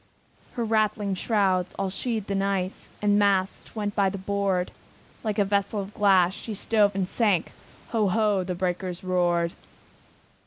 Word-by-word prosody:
Her 240 -2 -2
rattling 215 -2 +1
shrouds, 190 -3 +1
all 195 -1 -1
sheathed 215 0 -3
in 195 0 +1
ice, 195 -1 -2
With - - -28
the - - +4
masts 200 -1 +1
went 205 -2 -2
by 200 -2 +3
the 200 - -5
board; 195 -2 -1 0.5
Like 215 -2 -2
a 205 - +3
vessel 200 +1 0
of 200 +1 -6
glass, 190 -4 +4
she 215 +1 -6
stove 205 -1 +2
and 190 -2 0
sank, 200 -6 +1 0.4
Ho! 220 -3 +1
ho! 205 -1 +2
the 180 0 -3
breakers 180 0 -3
roared! 175 -2 +1
195 Hz, 160 wpm, -26 LUFS, 185-210 Hz, 0.5 s, the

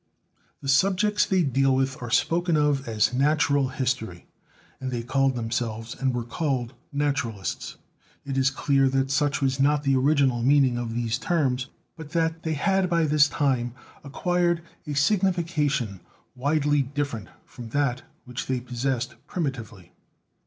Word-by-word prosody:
The - - -6
subjects 195 +8 +3
they 185 -2 +2
deal 135 -1 +2
'with 135 +2 -1
are 120 - -5
spoken 170 +6 +2
of 145 -3 +1
as 110 +1 +1
"Natural 140 0 +2
History," 125 -9 -3 0.5
and 130 - -4
they 120 -2 -3
called 135 +1 +1
themselves 115 -1 -3
and 135 -1 0
were 120 -1 -2
called 125 -1 -2 0.2
"Naturalists." 140 - -2 0.5
It 135 -1 -3
is 135 0 +3
clear 135 0 +2
that 135 0 0
such 145 -1 +1
was 135 0 +1
not 145 +1 +3
the 135 -1 +2
original 135 -2 +2
meaning 135 0 +4
of 120 -1 -3
these 120 0 -1
terms; 135 -7 0 0.3
but 160 -2 -10
that 165 -1 0
they 160 -1 -2
had 190 +4 +1
by 170 -2 +2
this 150 -1 +4
time, 130 -4 0 0.3
acquired 175 +3 0 0.2
a 145 - -3
signification 155 - +1 0.4
widely 145 +2 +1
different 135 - -3 0.2
from 120 -2 -10
that 130 -1 0 0.2
which 125 0 -6
they 130 -1 0
possessed 125 0 -2
primitively. 115 - -5
135 Hz, 145 wpm, -25 LUFS, 125-150 Hz, 0.5 s, meaning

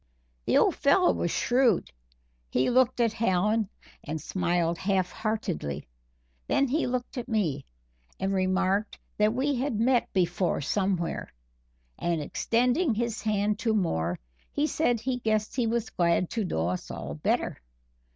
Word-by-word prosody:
The - - +3
old - - +4
fellow - - +4
was 85 0 -1
shrewd 240 - +2 0.6
he 130 - +1
looked 255 0 +3
at 230 -2 +2
Hallen 215 -1 +1 0.3
and 155 +1 -4
smiled 175 -1 0
half 190 -2 0
heartedly. 210 - -3 0.6
Then 275 - +2
he 290 +4 0
looked 250 +1 -3
at 240 - -7
me, 165 - 0 0.5
and 195 +1 0
remarked 190 +2 +1 0.2
that 210 0 +4
we 280 +3 +1
had 250 -4 -1
met 245 +1 +2
before 175 -1 +1
somewhere, 185 +2 -1 0.7
and 170 -2 0
extending 245 - +1
his 235 0 -2
hand 210 0 0
to 225 -2 +1
Moore, 90 - 0 0.3
he 290 - +1
said 245 -7 +1
he 250 +2 -2
guessed 215 -2 0
he 245 -3 +1
was 230 0 -1
glad 170 0 +1
to 225 -3 -1
know 85 - -1
us 90 - -4
all 70 - -5
better. 75 - -1
210 Hz, 145 wpm, -28 LUFS, 175-235 Hz, 0.7 s, old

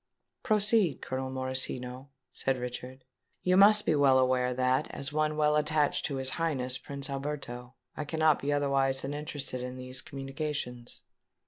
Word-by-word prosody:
"Proceed, 210 - +2
Colonel 130 0 -4
Morosino," 130 0 -2 0.2
said 135 -1 -1
Richard. 125 +1 -7 0.4
"You 180 0 +3
must 210 +2 +6
be - - +3
well 140 -3 +5
aware 130 -1 +2
that, 130 +1 +1
as 140 +1 -4
one 155 0 0
well 150 0 +3
attached 150 -1 +1
to 140 - -2
his 130 0 +1
Highness 130 -6 0
Prince 140 0 -5
Alberto, 135 -3 -5 0.2
I 150 - -4
cannot 155 0 +2
be 145 - -1
otherwise 135 -2 +1
than 135 +2 -3
interested 145 -3 -4
in 125 0 -6
these 130 0 -2
communications." 135 -3 -5
135 Hz, 150 wpm, -30 LUFS, 130-150 Hz, 0.4 s, must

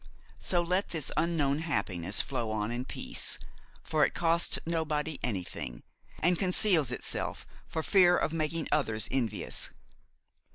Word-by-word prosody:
So 175 -2 +2
let 180 +3 0
this 160 -5 -1
unknown 155 -4 +1
happiness 100 - 0
flow 125 -5 -3
on 110 0 -2
in 120 +2 -3
peace, - - -3 0.5
for 155 -1 +1
it - - +1
costs 170 0 +3
nobody 160 -2 -1
anything, 100 -7 -3 0.3
and 175 0 +2
conceals 180 - +3
itself 125 - -2 0.2
for 160 - -3
fear 180 -2 +5
of 155 - 0
making 160 0 -1
others 115 -8 +2
envious. 125 -5 0
155 Hz, 130 wpm, -30 LUFS, 120-170 Hz, 0.5 s, fear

